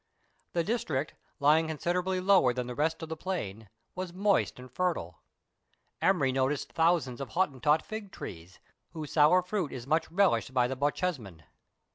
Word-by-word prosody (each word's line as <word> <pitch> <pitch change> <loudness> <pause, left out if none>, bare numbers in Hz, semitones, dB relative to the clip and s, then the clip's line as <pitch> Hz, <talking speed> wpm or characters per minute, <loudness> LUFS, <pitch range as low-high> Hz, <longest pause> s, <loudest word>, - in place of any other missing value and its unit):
The 170 - +1
district, 160 - -2 0.3
lying 155 +3 +4
consi 160 +2 -1
derably 185 0 -1
lower 185 -11 +5
than 125 0 -3
the 125 - -5
rest 160 +5 -1
of 160 - -6
the 160 - -3
plain, 110 - -5 0.2
was 185 -1 -5
moist 200 +2 +1
and 125 0 -11
fer 180 +4 +1
tile. 85 0 -8 0.8
Emery 150 -9 +3
noticed 135 +2 -1
thousands 160 -7 +1
of 135 - -5
Hottentot 150 -3 +2
fig 215 -3 -7
trees, 85 - -9 0.4
whose 155 -3 -6
sour 160 +4 +5
fruit 180 -5 -2
is 120 -2 -7
much 160 +3 +1
relished 165 - +2
by 125 -1 +4
the 130 +2 -2
Bochjesmen. 135 - -2
155 Hz, 165 wpm, -30 LUFS, 130-180 Hz, 0.8 s, lower